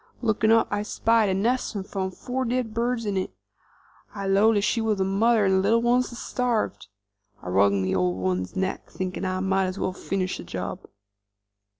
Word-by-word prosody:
Lookin' 220 Hz, -1 st, +2 dB
up, 225 Hz, 0 st, +4 dB
I 205 Hz, 0 st, 0 dB
spied 220 Hz, 0 st, +2 dB
a 190 Hz, -, +1 dB
nest 235 Hz, +2 st, 0 dB
'nd 190 Hz, -, -4 dB
four 200 Hz, +7 st, -3 dB
dead 245 Hz, -2 st, -1 dB
birds 235 Hz, 0 st, -1 dB
in 200 Hz, -2 st, -1 dB
it. 185 Hz, -, -3 dB, 0.8 s
I 200 Hz, -1 st, -4 dB
'lowed 200 Hz, +3 st, +4 dB
then 205 Hz, -, +1 dB
she 230 Hz, -, +1 dB
was 220 Hz, -2 st, +1 dB
the 190 Hz, -, +1 dB
mother 210 Hz, +2 st, +3 dB
'nd 190 Hz, 0 st, +3 dB
the -, -, +3 dB
little 220 Hz, +4 st, +3 dB
ones 245 Hz, +1 st, +2 dB
had 240 Hz, -, -9 dB
starved. 245 Hz, -, -2 dB, 0.6 s
I 90 Hz, -, -5 dB
wrung 100 Hz, +1 st, +3 dB
the 95 Hz, -, 0 dB
old 90 Hz, 0 st, +1 dB
one's 95 Hz, 0 st, -2 dB
neck, 190 Hz, 0 st, -2 dB
thinking 185 Hz, +1 st, -4 dB
I 185 Hz, 0 st, -1 dB
might 190 Hz, 0 st, +1 dB
as 185 Hz, +1 st, -4 dB
well 185 Hz, -, -1 dB
finish 185 Hz, 0 st, -3 dB
the -, -, -6 dB
job." 85 Hz, -, -6 dB
200 Hz, 200 wpm, -25 LUFS, 185-230 Hz, 0.8 s, up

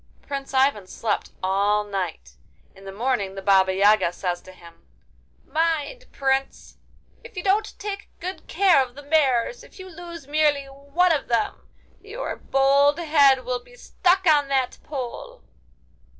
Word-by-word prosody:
Prince 275 Hz, -1 st, -6 dB
Ivan 265 Hz, -7 st, +2 dB
slept 210 Hz, +2 st, -3 dB
all 200 Hz, +2 st, +2 dB
night. 195 Hz, -5 st, -5 dB, 0.4 s
In 195 Hz, -, -16 dB
the 195 Hz, -, -7 dB
morning 205 Hz, -2 st, -2 dB
the 195 Hz, -, -6 dB
Baba 190 Hz, -1 st, +4 dB
Yaga 200 Hz, -1 st, +3 dB
says 175 Hz, -1 st, -3 dB
to 185 Hz, -, -14 dB
him: 170 Hz, -2 st, -17 dB, 0.6 s
'Mind, 330 Hz, +10 st, -1 dB
Prince! 270 Hz, 0 st, -2 dB, 0.5 s
if 465 Hz, -3 st, -13 dB
you 360 Hz, -, -3 dB
don't 410 Hz, +2 st, 0 dB
take 410 Hz, 0 st, -6 dB
good 370 Hz, +2 st, -7 dB
care 375 Hz, -8 st, +4 dB
of 250 Hz, -1 st, -11 dB
the 290 Hz, -, -11 dB
mares, 285 Hz, -, +1 dB
if -, -, -17 dB
you 375 Hz, -1 st, -9 dB
lose 340 Hz, -3 st, -10 dB
merely 290 Hz, -1 st, +1 dB
one 280 Hz, +6 st, 0 dB
of 300 Hz, -4 st, 0 dB
them—your 410 Hz, -, -5 dB
bold 280 Hz, +2 st, +3 dB
head 285 Hz, -5 st, +4 dB
will 250 Hz, -1 st, -3 dB
be -, -, -18 dB
stuck 375 Hz, -5 st, +1 dB
on 295 Hz, -4 st, +4 dB
that 265 Hz, -2 st, -1 dB
pole! 300 Hz, -, -7 dB
275 Hz, 150 wpm, -23 LUFS, 215-335 Hz, 0.6 s, Baba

